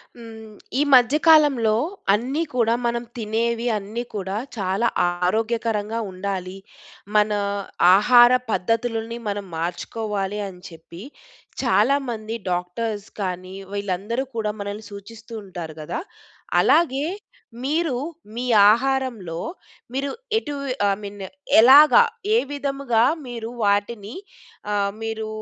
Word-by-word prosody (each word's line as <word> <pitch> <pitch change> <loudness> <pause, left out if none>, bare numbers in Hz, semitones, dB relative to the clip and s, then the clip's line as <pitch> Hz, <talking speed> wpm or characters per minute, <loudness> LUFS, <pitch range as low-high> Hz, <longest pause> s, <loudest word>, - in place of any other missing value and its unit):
హ్మ్, 220 -2 -11 0.3
ఈ - - +4
మధ్య 250 +2 +6
కాలంలో 290 -9 +5 0.4
అన్నీ 260 +9 0
కూడా 230 -2 +2
మనం 235 0 -1
తినేవి 230 +2 -1
అన్నీ 210 +4 -5
కూడా 190 -1 -3 0.2
చాలా 195 +3 0 0.2
ఆరోగ్యకరంగా 220 +4 -1
ఉండాలి, 185 0 -4 0.6
మన 210 0 +4 0.6
ఆహార 240 +4 +7 0.2
పద్ధతులని 230 +3 -1
మనం 205 0 -3
మార్చుకోవాలి 200 +4 -3
అని 180 -2 -11
చెప్పి, 170 +1 -13 0.6
చాలా 275 - +3
మంది 220 -1 -4 0.2
డాక్టర్స్ 205 +4 -3
కానీ 185 0 -4 0.2
వీళ్ళందరూ 205 +5 -2
కూడా 215 -1 -1
మనల్ని 205 +2 -6
సూచిస్తూ 220 +3 -11
ఉంటారు 175 -4 -7
కదా! 230 - -4 0.6
అలాగే 295 -3 +3 0.6
మీరు 305 0 0 0.4
మీ 240 - -3 0.3
ఆహారంలో 240 -8 -1 0.6
మీరు 275 +1 -1 0.3
ఎటు 295 -10 -3 0.3
ఐ - - +3
మీన్ 200 0 -8 0.4
ఎలాగా 285 - +8 0.3
ఏ - - +6
విధముగా 275 -5 0 0.2
మీరు 230 -2 -6
వాటిని, 205 +2 0 0.6
ఆహ్, 200 -1 +1
మీరు 220 -1 -4
220 Hz, 105 wpm, -22 LUFS, 200-240 Hz, 0.6 s, ఎలాగా